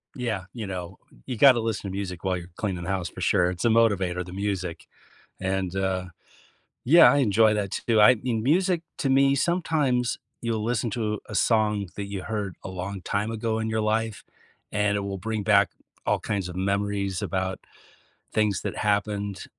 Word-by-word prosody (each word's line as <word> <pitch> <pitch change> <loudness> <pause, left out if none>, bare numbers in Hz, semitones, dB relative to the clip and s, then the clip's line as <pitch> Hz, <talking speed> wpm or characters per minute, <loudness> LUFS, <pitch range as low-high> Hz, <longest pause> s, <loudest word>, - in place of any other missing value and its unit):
Yeah, 115 -7 -2
you 110 -5 -5
know, 90 0 -6 0.3
you 125 - -4
gotta 130 -1 +7
listen 110 -3 -2
to 95 - -5
music 90 -3 -5
while 95 -1 0
you're 85 0 -9
cleaning 95 -5 -3
the 85 - -5
house 95 -3 -1
for 95 - -10
sure, 90 -1 +3
it's 90 +5 -4
a - - +5
motivator, 95 -6 +2
the 90 - -10
music. 95 -3 -3 0.6
And, 95 -1 -1
uh 95 -1 -1 0.8
Yeah, 165 +7 +8
I 145 - +2
enjoy 110 -3 +4
that 100 -2 -2 0.2
too. 110 -2 +4
I 125 +4 +8
mean, 115 -1 -2
music 175 +4 +2 0.2
to 135 - 0
me, 135 +1 +4
sometimes 145 -7 +1 0.2
you'll 115 -2 -1
listen 120 0 0
to 105 -2 -2
a 105 - -7
song 105 -4 +2
that 100 - -4
you 100 -2 -5
heard 105 -4 -3
a - - -6
long 95 +1 -5
time 105 +4 -1
ago 110 0 -1
in 110 - -2
your 110 0 0
life, 110 0 -1 0.5
and 105 0 +1
it 100 - -1
will 100 -1 -4
bring 110 +2 -3
back 100 -2 +4 0.4
all - - +2
kinds 95 -3 -3
of 90 - -8
memories 100 0 -1
about 95 0 -2 0.7
things 105 -3 +1
that - - -4
happened. 100 -1 -1
105 Hz, 185 wpm, -26 LUFS, 95-115 Hz, 0.8 s, Yeah